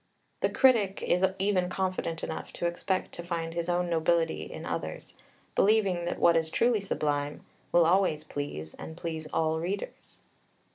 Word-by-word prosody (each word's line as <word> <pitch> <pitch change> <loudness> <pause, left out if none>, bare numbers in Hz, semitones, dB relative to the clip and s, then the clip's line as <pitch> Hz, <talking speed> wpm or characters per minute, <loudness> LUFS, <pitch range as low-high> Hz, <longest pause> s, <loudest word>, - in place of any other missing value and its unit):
The - - +2
critic 225 -8 +3
is 180 +2 +2
even 190 -2 +1
confident 185 -3 -2
enough - - -5
to - - -3
expect 180 +2 -1
to 170 - -7
find 165 -1 -3
his 170 +1 -2
own 175 0 +1
nobility 165 0 +1
in - - -7
others, - - -5 0.4
believing 195 -5 +3
that 175 - -2
what 170 - +5
is 160 -1 +1
truly 230 +4 +2
Sublime 145 -6 -2 0.3
"will 170 -1 +5
always 170 -3 +3
please, 80 - -5
and 160 - -9
please 160 -3 -4
all 160 0 +1
readers." 190 +5 -5
170 Hz, 155 wpm, -29 LUFS, 160-190 Hz, 0.4 s, what